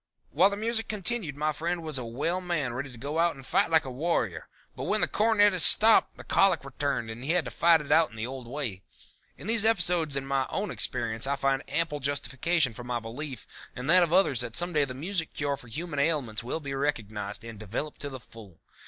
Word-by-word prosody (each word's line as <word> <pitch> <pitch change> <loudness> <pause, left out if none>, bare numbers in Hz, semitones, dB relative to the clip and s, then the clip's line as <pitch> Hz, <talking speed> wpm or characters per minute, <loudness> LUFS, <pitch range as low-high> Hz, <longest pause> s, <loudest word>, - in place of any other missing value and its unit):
"While 180 +7 +5
the 200 - -4
music 225 +1 0
continued 200 -7 -2
my 155 +1 0
friend 170 +2 -3
was 155 -4 -2
a - - -4
well 145 +10 -2
man 160 -9 -2
ready 135 +2 -5
to 120 - -12
go 145 +7 -3
out 170 -1 +2
and 135 -1 -12
fight 195 +6 +2
like 160 -2 +3
a 130 - -5
warrior, 165 +7 -1 0.3
but - - -5
when - - +1
the - - +4
cornetist 205 -5 +4
stopped 220 +1 +6
the - - -10
colic 195 -8 +3
returned 135 -3 -2
and 120 +3 -8
he 155 +5 0
had 175 -4 +1
to - - -5
fight 165 -1 +4
it 145 - -7
out 165 -1 +5
in 115 - -15
the 110 0 -3
old 130 -1 -7
way. 120 -8 -4 0.6
In - - -11
these 225 0 +3
episodes 175 -8 +2
in 135 0 -2
my 135 -1 0
own 205 +1 -3
experience 115 -1 0
I 140 - +1
find 135 -1 0
ample 165 -3 -1
justification 140 +1 0
for 120 - -9
my 120 0 -2
belief 125 +5 -7 0.3
and 125 +2 -6
that 185 +1 +7
of 170 -2 +2
others 160 - +3
that 120 -1 -5
some 175 +4 0
day 150 -2 +3
the 130 -2 -7
music 165 +3 -3
cure 145 -1 -1
for 125 - -14
human 150 +4 -5
ailments 140 -8 0
will 125 +7 -3
be 140 -2 -5
recognized 110 -7 -3
and 115 -3 -9
developed 110 +8 -5
to 145 - -4
the 130 -1 -8
full. 105 -8 -15
145 Hz, 230 wpm, -28 LUFS, 125-170 Hz, 0.6 s, that